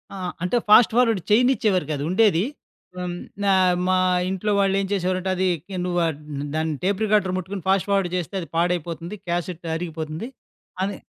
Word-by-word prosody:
ఆ! - - -7 0.3
అంటే 180 +7 +1
fast 220 +1 +7
forward 230 -5 +3
చేయనిచ్చేవారు 220 - +3
కాదు. 145 - -3
ఉండేది 195 -3 +4 0.5
హ్మ్, 180 -1 -3 0.3
నా 200 - +3 0.4
మా 185 - +3 0.3
ఇంట్లో 190 +2 -1
వాళ్లు 195 -1 +2
ఏం 195 - -1
చేసేవారంటే, 185 -1 0
అదికే 185 0 -1
"నువ్వ 180 -1 -1 0.6
దాని 160 0 0
టేప్ 200 +2 0
రికార్డర్ 200 -3 +2
ముట్టుకొని 185 0 -5
ఫాస్ట్ 195 +1 +2
ఫార్వర్డ్ 195 -3 +2
చేస్తే 180 +2 -5
అది 165 - -7
పాడైపోతుంది, 170 +1 -1
క్యాసెట్ 175 0 -3
అరిగిపోతుంది" 160 +2 -5 0.6
అని. 200 +1 -2
185 Hz, 150 wpm, -23 LUFS, 175-200 Hz, 0.6 s, ఫాస్ట్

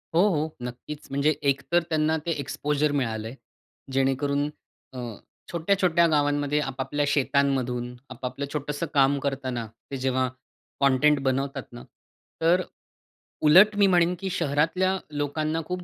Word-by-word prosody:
हो, 170 - +6
हो. 155 -3 0
नक्कीच. 125 +5 -7
म्हणजे 140 +2 +2 0.2
एकतर 165 +5 0
त्यांना 155 0 +2
ते 170 - 0
एक्सपोजर 145 +1 -1
मिळालं 115 -6 -1
आहे. 115 - -8 0.6
जेणेकरून 140 +2 +1 0.4
अ, 130 - -6 0.5
छोट्या-छोट्या 170 0 +2
गावांमध्ये, 145 -1 +1
आपापल्या 135 +1 -2
शेतांमधून, 130 -3 0
आपापलं 130 +2 -5
छोटसं 150 +1 -3
काम 140 0 +4
करताना, 130 -4 -3 0.3
ते 135 - -3
जेव्हा 130 0 +1 0.5
कंटेंट 140 +2 +4
बनवतात 135 0 -1
ना, 120 0 -10 0.6
तर 170 +3 +4
अ, - - -6 0.8
उलट 190 +8 +7
मी 200 -1 +5
म्हणेन 175 -1 +3
की 195 0 -3
शहरातल्या 170 +4 +1 0.2
लोकांना 155 +2 -1
खूप 180 +1 -4
145 Hz, 130 wpm, -26 LUFS, 135-160 Hz, 0.8 s, उलट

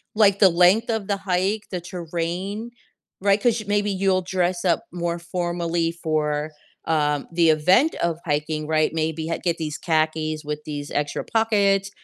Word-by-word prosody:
Like, 200 -2 +4
the 195 - +8
length 180 +7 +4
of 220 -3 -2
the 200 - 0
hike, 195 +2 -1
the 180 -2 -3
terrain, 180 +6 -4 0.5
right? 200 +1 +3
'Cause 235 -1 +2
y - - -7
maybe 205 0 +1
you'll 190 -1 +1
dress 180 0 -1
up 170 -2 +1
more 170 -1 -2
formally 170 -1 -1
for, 155 -2 -1 0.4
um, 150 -3 0
the 165 -1 +4
event 180 - +4
of 170 -1 -1
hiking, 150 0 -1
right? 155 0 +1
Maybe 160 0 -2
ha 165 - -2
get 170 -2 0
these 155 -2 -4
khakis 155 -1 0
with 150 0 -4
these 145 -1 -6
extra 145 0 -2
pockets 200 -3 +2
175 Hz, 165 wpm, -23 LUFS, 155-195 Hz, 0.5 s, the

